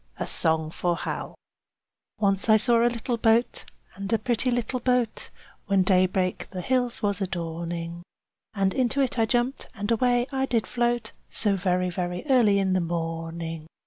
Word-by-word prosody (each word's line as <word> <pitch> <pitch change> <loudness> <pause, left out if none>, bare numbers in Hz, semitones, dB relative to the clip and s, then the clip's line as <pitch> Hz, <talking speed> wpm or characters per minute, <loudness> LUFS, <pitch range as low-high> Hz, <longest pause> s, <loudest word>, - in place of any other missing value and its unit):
A - - -1
SONG 160 -1 +4
FOR 175 +1 -1
HAL - - -5 0.8
Once 200 0 +1
I 215 - +7
saw 230 +2 +4
a 240 - +4
little 240 0 -3
boat, 230 +2 +2 0.3
and 195 +1 -6
a 225 - +4
pretty, 240 +2 -1
pretty 245 +1 -1
boat, 250 -2 0 0.4
When 195 -2 +3
daybreak 185 0 +1
the 185 - -5
hills 245 +1 0
was 205 0 0
adorning, 170 -1 -4 0.5
And 195 -2 +1
into 260 +1 0
it 255 -3 0
I 225 - +3
jumped, 245 +3 -1
and 205 +1 -3
away 245 +1 +2
I 265 0 -1
did 230 -4 0
float, 240 -2 -1 0.2
So 205 -3 +2
very, 180 -1 0
very 175 - -4
early 225 -6 +5
in 190 -1 +1
the 185 - +2
morning. 165 -1 -4
200 Hz, 165 wpm, -25 LUFS, 180-240 Hz, 0.8 s, I